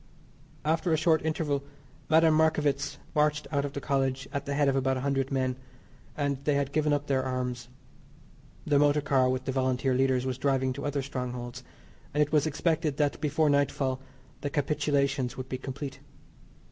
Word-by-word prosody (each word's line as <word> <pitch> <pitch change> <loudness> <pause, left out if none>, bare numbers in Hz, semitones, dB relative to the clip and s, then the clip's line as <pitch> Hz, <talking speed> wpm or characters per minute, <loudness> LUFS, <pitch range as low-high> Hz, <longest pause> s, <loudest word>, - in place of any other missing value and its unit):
After 165 +3 +1
a 160 - +4
short 160 -1 +3
interval 150 -3 -1 0.5
Madame 160 0 +5
Marckievicz 150 -3 +1 0.2
marched 150 0 +2
out 140 -1 +1
of 140 - -5
the 140 - -3
College 135 -2 -1
at 140 - -3
the 140 - -1
head 145 0 +3
of 135 - +2
about 135 0 +1
100 135 0 -1
men, 130 -1 0 0.6
and 140 -2 -1
they 145 0 +2
had 140 -1 0
given 150 0 +1
up 145 0 +1
their 135 -2 +1
arms; 125 -1 -3 1.0
the 145 -2 +3
motor 145 0 +4
car 135 -3 +3
with 130 0 -1
the - - -1
Volunteer 130 0 +1
leaders 130 0 +2
was 130 -1 -3
driving 130 -1 +1
to - - -6
other 145 -1 -1
strongholds, 125 -1 -5 0.5
and 150 - +5
it 145 - -5
was 155 0 +3
expected 155 -1 0
that 145 -2 0
before 155 +1 +2
nightfall 140 -2 +1 0.4
the 145 - -2
capitulations 140 -3 0
would 130 0 -6
be 130 - -3
complete. 135 +1 -6
140 Hz, 175 wpm, -28 LUFS, 130-150 Hz, 1.0 s, Madame